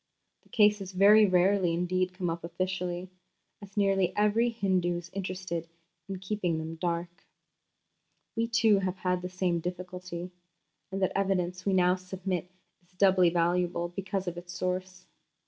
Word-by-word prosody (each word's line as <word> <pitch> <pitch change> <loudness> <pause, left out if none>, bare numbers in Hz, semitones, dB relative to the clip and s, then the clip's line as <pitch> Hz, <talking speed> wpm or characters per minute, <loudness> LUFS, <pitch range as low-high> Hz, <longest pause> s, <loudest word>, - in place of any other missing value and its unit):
The - - -28
cases 210 -3 +3
very 205 +3 +7
rarely 185 -1 +3
indeed 185 +1 0
come 180 -2 -1
up 165 0 -5
officially, 180 +1 -3 0.5
as 200 0 -13
nearly 195 -2 +2
every 210 +3 +3
Hindu 185 -6 0
is 175 0 -9
interested 185 -3 -4 0.4
in 195 - -3
keeping 185 -3 -2
them 160 +1 -4
dark." 170 +1 -3 1.1
We, 230 0 0
too, 220 -3 +4
have 185 -1 -2
had 180 -1 -1
the 180 - -5
same 180 -2 0
difficulty, 180 0 -6 0.6
and 195 0 -2
the 185 - 0
evidence 185 -2 0
we 195 - +3
now 180 0 +4
submit 185 -1 -4 0.3
is 180 +1 -32
doubly 185 -1 +5
valuable 175 0 +1
because 195 +1 -4
of 175 0 -3
its 175 0 -11
source. 185 0 -3
185 Hz, 145 wpm, -29 LUFS, 175-195 Hz, 1.1 s, very